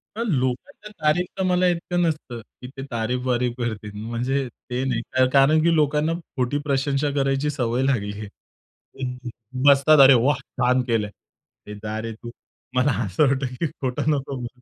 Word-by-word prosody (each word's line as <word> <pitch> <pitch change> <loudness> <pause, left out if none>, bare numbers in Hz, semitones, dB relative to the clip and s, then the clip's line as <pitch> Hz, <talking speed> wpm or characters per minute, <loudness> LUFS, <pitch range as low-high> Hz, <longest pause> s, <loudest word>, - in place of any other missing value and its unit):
तर 230 - -2
लोकांच्या 130 - -2
तारीफ 155 +4 +3
तर 190 - 0
मला 180 0 +3
इतकं 175 +1 -1
नसतं, 155 -8 -2
की 125 +3 -13
ते - - -5
तारीफ-वारीफ 125 +1 -1
करतील. 110 -4 -4
म्हणजे 125 +4 -1 0.2
ते 125 +1 -1
नाही 120 -3 0 0.3
कारण 140 +3 +5
की 170 0 +4
लोकांना 150 +1 +2 0.2
खोटी 130 +2 0
प्रशंसा 140 +1 +1
करायची 135 +1 +1
सवय 125 -3 -1
लागली 105 -7 0
आहे. 105 - -6
तर 130 - -16 0.2
ते - - -3 0.4
बसतात, 145 +2 +6
"अरे 135 0 +9
वाह! 130 +3 +3 0.2
छान 125 +1 +3
केलं 115 -4 0
आहे." 105 0 -19
"ए - - -6
जा 110 0 -3
रे 115 0 -5
तू, 120 +2 -10 0.4
मला 130 +3 +3
असं 100 +10 +2
वाटतं 135 -1 -1
की 165 - +1
खोटं 130 +1 -3
नको 140 -1 -2
म्हणू." 125 +1 -8
130 Hz, 170 wpm, -23 LUFS, 120-150 Hz, 0.4 s, अरे